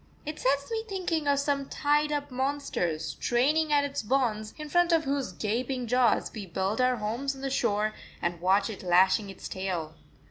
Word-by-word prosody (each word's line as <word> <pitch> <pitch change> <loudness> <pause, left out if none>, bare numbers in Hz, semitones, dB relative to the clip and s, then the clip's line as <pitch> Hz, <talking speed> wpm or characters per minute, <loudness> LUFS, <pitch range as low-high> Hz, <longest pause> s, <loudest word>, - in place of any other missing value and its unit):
It 305 +1 -5
sets 280 - +1
me 445 -1 -1
thinking 350 -6 -1
of 285 0 +3
some 280 -1 -1
tied 295 +1 +1
up 290 -2 -2
monster 260 - -1
straining 255 - +1
at 290 -1 +4
its 285 -1 -2
bonds, 220 -3 0
in 305 -1 -6
front 350 +3 +3
of 325 -1 +4
whose 275 -5 -1
gaping 240 +6 -2
jaws 250 +1 +2
we 205 -4 -6
build 190 +6 -1
our 255 0 +3
homes 240 +6 -2
on 270 - -11
the 270 0 -2
shore 215 -4 +1 0.3
and 175 -1 -2
watch 195 +2 +3
it 205 - -8
lashing 190 +3 +4
its 195 - -8
tail. 180 -5 -3
255 Hz, 185 wpm, -28 LUFS, 205-285 Hz, 0.3 s, at